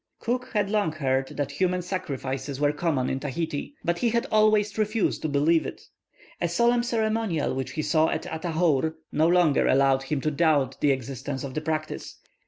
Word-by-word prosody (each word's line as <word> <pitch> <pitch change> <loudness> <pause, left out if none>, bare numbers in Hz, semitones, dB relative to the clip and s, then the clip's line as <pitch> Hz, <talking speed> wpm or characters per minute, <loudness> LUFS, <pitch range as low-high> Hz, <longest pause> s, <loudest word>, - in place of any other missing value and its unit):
Cook 250 +1 -2
had 205 -2 +1
long 205 -7 +1
heard 135 -3 0
that 140 -1 -2
human 180 +4 0
sacrifices 140 -6 -4
were 145 0 +3
common 150 -4 0
in 135 - -1
Tahiti, 150 - -4
but 170 0 0
he 240 - +2
had 235 +1 0
always 215 -1 +3
refused 215 0 0
to 155 - -1
believe 150 +3 +3
it. - - -7 0.6
A 170 - +1
solemn 235 +7 +3
ceremonial 220 - 0
which 130 -1 -4
he 155 - -2
saw 160 0 +3
at 155 - -2
Atahour, 160 -2 0 0.2
no 155 +2 +3
longer 175 -4 +3
allowed 135 0 +4
him 135 +1 -2
to 155 - 0
doubt 145 -4 +1
the 145 - +3
existence 135 +1 -3
of 135 -2 -5
the 155 - -2
practice. 155 0 -4
155 Hz, 185 wpm, -26 LUFS, 140-185 Hz, 0.6 s, allowed